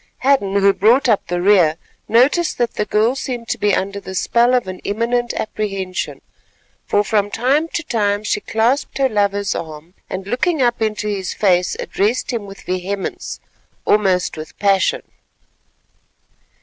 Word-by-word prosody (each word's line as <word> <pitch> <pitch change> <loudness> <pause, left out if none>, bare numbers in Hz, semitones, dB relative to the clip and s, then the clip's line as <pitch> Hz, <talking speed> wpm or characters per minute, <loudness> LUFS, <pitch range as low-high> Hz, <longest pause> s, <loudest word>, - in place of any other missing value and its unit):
Hadden, 255 -8 +2
who 200 0 +4
brought 240 +9 +3
up 220 -4 +2
the 175 0 -2
rear, 180 -6 +5 0.3
noticed 275 +9 +3
that 240 -1 0
the 210 - -1
girl 220 +5 +2
seemed 245 -3 -5
to - - -2
be 205 -1 +2
under 200 +1 -2
the 190 -1 -8
spell 240 +6 +3
of 245 -5 0
an 185 0 -6
imminent 235 +3 -1
apprehension, 195 -4 -3 0.7
for 205 - +2
from 205 -1 +1
time 270 +9 +1
to 335 - -4
time 205 -6 0
she - - 0
clasped 235 +6 0
her 270 -1 +3
lover's 205 -3 0
arm, 160 +1 -7 0.2
and 190 0 -5
looking 290 - 0
up 240 -2 +1
into 215 -1 -1
his 195 -3 -3
face, 180 -3 +2
addressed 220 +6 -1
him 220 -4 -3
with 195 0 -11
vehemence, 185 +2 -4 0.5
almost 190 -5 +2
with 155 -3 -9
passion. 195 -2 +2
210 Hz, 155 wpm, -19 LUFS, 195-240 Hz, 0.7 s, rear